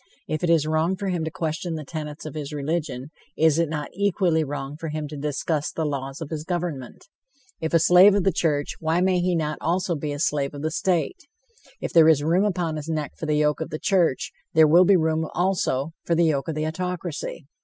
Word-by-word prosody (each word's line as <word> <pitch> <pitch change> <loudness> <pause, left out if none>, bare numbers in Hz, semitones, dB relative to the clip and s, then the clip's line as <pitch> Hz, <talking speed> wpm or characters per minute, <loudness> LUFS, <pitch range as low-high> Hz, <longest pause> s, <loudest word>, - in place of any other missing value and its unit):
If 155 +1 -3
it 175 - +1
is 165 -3 +4
wrong 160 +4 +1
for 195 0 -3
him 175 -3 -1
to - - -2
question 160 +1 -3
the 155 -2 -6
tenets 150 0 -6
of 155 - -6
his 150 -2 -5
religion, 150 -2 -3 0.3
is 160 0 +4
it 165 -2 +1
not 150 -2 -4
equally 185 -4 +1
wrong 145 -1 -5
for 165 +1 -6
him 155 0 -4
to 150 - -7
discuss 150 +1 -2
the 160 - -2
laws 135 0 -4
of 155 - -6
his 155 -1 -3
government? 165 -7 -4 0.5
If 160 - -2
a - - +8
slave 180 +4 +7
of 200 - +2
the 195 - +3
church, 145 -5 0
why 160 +2 +1
may 185 0 +2
he 180 0 +1
not 155 -2 -2
be - - -15
also 180 +1 0
a 145 -1 -4
slave 145 -1 -1
of 145 - -7
the 155 - -1
state? 180 - -1 0.5
If - - -5
there 160 -1 +7
is 150 -3 +4
room 175 +6 +2
upon 175 -6 -1
his 155 +1 -6
neck 155 -2 -2
for 160 - -6
the 150 0 +1
yoke 150 +1 +1
of 160 - -3
the 155 - -4
church, 175 -7 +1 0.2
there 160 -1 +7
will 175 +4 +6
be 195 +1 +5
room, 160 -1 0
also, 170 -6 0
for 170 - +1
the 170 +1 +3
yoke 145 -3 0
of 160 - -3
the 155 0 -1
autocracy. 175 -2 -4
160 Hz, 230 wpm, -24 LUFS, 150-175 Hz, 0.5 s, a